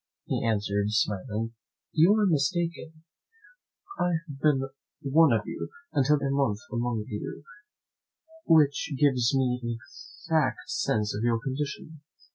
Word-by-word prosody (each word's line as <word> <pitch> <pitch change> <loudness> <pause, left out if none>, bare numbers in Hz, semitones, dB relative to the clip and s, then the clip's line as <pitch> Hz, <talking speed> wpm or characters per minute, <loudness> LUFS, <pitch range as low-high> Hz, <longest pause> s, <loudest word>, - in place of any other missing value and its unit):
He - - -2
answered, 105 -2 0
smiling, 110 +1 -1 0.4
"You 170 +6 +5
are 215 -1 +3
mistaken; 165 0 -1 1.0
I 175 0 +2
have 145 -5 -9
been 145 -4 +3 0.4
one 145 +2 +5
of 110 -2 +2
you, - - -5 0.2
and 140 - +3
lived 150 -1 +3
a 135 - 0
month 140 -7 +1
amongst 120 -1 -2
you, 105 +6 -5 1.0
which 150 -2 +4
gives 130 -2 +3
me 125 -2 +1
an 120 - -4
exact 115 - -3
sense 105 -1 0
of 105 - -3
your 115 -1 +2
condition. 140 +4 -5
135 Hz, 130 wpm, -27 LUFS, 115-150 Hz, 1.0 s, You